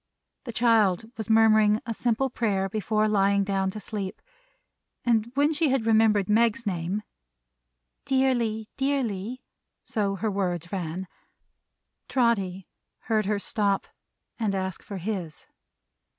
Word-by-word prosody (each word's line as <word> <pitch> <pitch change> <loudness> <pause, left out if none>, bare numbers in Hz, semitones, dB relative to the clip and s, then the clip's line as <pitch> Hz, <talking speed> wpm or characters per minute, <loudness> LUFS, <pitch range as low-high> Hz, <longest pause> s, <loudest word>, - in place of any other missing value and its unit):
The 240 - -4
child 225 -3 +2
was 220 -1 -6
murmuring 215 -1 +5
a 230 - -2
simple 240 +3 0
Prayer 200 -6 0
before 215 +1 0
lying 200 -1 +3
down 195 -1 0
to 215 - -6
sleep; 200 -2 -5 0.9
and 235 -1 +2
when 290 +3 +3
she 310 0 +1
had 260 -4 +1
remembered 220 -3 +4
Meg's 230 +2 +2
name, 185 +2 -2 1.0
"Dearly, 240 -5 +1
Dearly" 255 -4 -1 0.4
so 200 -2 -1
her 215 +2 -1
words 180 -3 -2
ran 180 -1 -4 1.0
Trotty 195 -7 +1 0.3
heard 215 -3 0
her 210 0 +1
stop 200 -1 0 0.5
and 210 -3 0
ask 190 -2 -3
for 200 - -7
his. 180 -4 -5
215 Hz, 120 wpm, -26 LUFS, 195-230 Hz, 1.0 s, murmuring